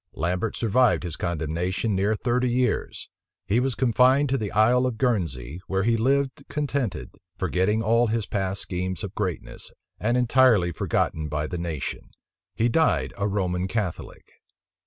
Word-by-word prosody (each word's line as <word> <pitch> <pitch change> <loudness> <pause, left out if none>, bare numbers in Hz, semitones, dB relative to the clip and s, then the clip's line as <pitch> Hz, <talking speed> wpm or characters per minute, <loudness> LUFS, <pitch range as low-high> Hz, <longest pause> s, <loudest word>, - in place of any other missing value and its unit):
Lambert 90 +6 -2
survived 120 +1 +2
his 85 -3 -4
condemnation 85 +5 -2
near 100 +3 +1
thirty 125 +2 0
years. 125 -1 -1 0.4
He 110 +5 +2
was 130 -1 0
confined 130 +3 +3
to 135 - +1
the 105 -2 -3
Isle 120 +4 +3
of 120 -3 -4
Guernsey, 85 - -1
where 95 0 0
he 115 +1 +2
lived 135 +4 0
contented, 140 -6 -2 0.3
forgetting 95 +4 +1
all 115 +2 +3
his 110 -1 -1
past 95 -1 -2
schemes 90 -2 -3
of 100 - -5
greatness, 95 -6 -4 0.3
and 120 +3 +1
entirely 125 -7 +4
forgotten 80 -1 -1
by 75 +1 -2
the 90 +2 -4
nation. 85 -5 -5 0.5
He 115 - +2
died 90 - +1
a 100 0 -1
Roman 95 -2 -1
Catholic. 100 -5 -4
105 Hz, 150 wpm, -25 LUFS, 90-125 Hz, 0.5 s, entirely